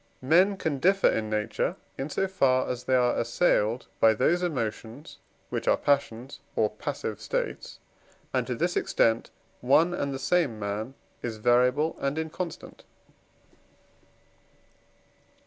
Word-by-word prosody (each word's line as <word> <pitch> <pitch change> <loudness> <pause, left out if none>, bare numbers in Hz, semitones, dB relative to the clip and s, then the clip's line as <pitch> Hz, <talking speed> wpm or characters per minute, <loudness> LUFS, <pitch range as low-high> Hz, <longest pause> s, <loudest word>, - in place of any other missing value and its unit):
Men 180 +8 +4
can 150 -6 -2
differ 195 +5 +4
in 110 -1 0
nature, 105 0 -1 0.2
in 135 +2 -4
so 195 +5 0
far 130 -9 +2
as 125 0 -4
they 130 - +2
are 125 -1 +2
assailed 115 -2 +1
by 110 -1 +5
those 160 +10 +2
emotions, 120 -4 -4 0.3
which - - -3
are - - +4
passions, 135 -3 -1 0.2
or - - +2
passive - - -5
states; - - -4 0.6
and - - 0
to - - -2
this - - -1
extent 115 - +1 0.3
one 155 +8 +3
and 140 -5 -2
the 135 - -3
same 135 -3 +1
man 105 +5 -4 0.3
is 115 -2 -4
variable 125 +7 +2
and 140 +2 -2
inconstant. 160 +2 -6
135 Hz, 130 wpm, -27 LUFS, 115-165 Hz, 0.6 s, by